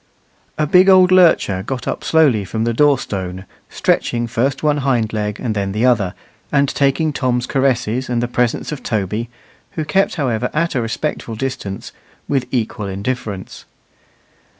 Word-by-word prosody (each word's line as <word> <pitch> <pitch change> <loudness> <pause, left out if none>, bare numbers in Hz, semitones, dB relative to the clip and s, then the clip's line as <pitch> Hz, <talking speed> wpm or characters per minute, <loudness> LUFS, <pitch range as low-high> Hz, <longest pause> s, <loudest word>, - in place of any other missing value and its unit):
A 155 - +1
big 180 +5 +5
old 185 -1 +6
lurcher 165 - +4
got 130 +5 -5
up - - -3
slowly 145 -10 +3
from 110 +4 -3
the 115 0 0
door 145 +3 +4
stone, 95 -3 -5 0.2
stretching 120 0 0
first 130 +4 -1
one 150 -1 +2
hind 125 -6 0
leg 105 -1 -2
and 115 -3 -2
then 100 -2 -2
the 110 +4 +1
other, 105 -8 +2 0.4
and 140 0 +3
taking 140 +3 +1
Tom's 125 -2 0
caresses 130 -2 0
and 120 -1 0
the 120 - 0
presence 125 +2 -1
of 150 -4 -5
Toby, 110 +1 -2 0.4
who 155 - -3
kept, 190 +6 +1
however, 125 - -1
at 165 +2 +1
a 130 - 0
respectful 115 0 -3
distance, 130 -5 -5 0.4
with 135 -3 0
equal 110 -4 -2
indifference. 100 0 -5
125 Hz, 160 wpm, -18 LUFS, 110-140 Hz, 0.4 s, old